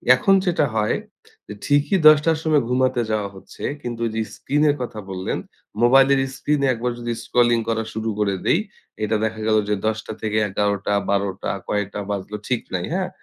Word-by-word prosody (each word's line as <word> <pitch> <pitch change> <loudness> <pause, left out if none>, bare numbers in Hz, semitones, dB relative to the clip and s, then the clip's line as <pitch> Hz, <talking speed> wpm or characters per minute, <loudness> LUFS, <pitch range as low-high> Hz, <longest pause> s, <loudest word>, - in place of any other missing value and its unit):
এখন 195 +10 +3
যেটা 175 -5 +2
হয় 105 -1 +1 0.6
এ - - -4
ঠিকই 145 +7 +3
১০ 155 0 +9
টার 165 -1 +3
সময় 155 -4 +3
ঘুমাতে 125 -1 +2
যাওয়া 105 -2 -1
হচ্ছে, 95 - -12 0.2
কিন্তু 120 -1 -5
ওইযে 110 0 -2
স্ক্রিনের 150 +1 +1
কথা 115 -3 -5
বললেন, 95 -1 -3 0.4
মোবাইলের 135 +3 +5 0.2
স্ক্রিনে 145 -2 +1
একবার 120 +1 -2
যদি 120 0 -3
স্ক্রলিং 120 -1 +3
করা 115 0 0
শুরু 110 +1 -2
করে 100 -2 +1
দেই। - - +3 0.4
এটা 105 +1 +1
দেখা 110 0 -2
গেল 110 - +4
যে 105 - +2
১০ 110 0 +1
টা - - -5
থেকে 110 -1 -1
১১ 100 +1 +1
টা, 105 - +1 0.2
১২ 100 0 +1
টা, - - 0 0.2
কয়েকটা 105 0 -2
বাজলো 100 +1 -4
ঠিক 125 -3 0
নাই, 90 - -2
হ্যাঁ? 185 0 -1
115 Hz, 185 wpm, -22 LUFS, 105-140 Hz, 0.6 s, ১০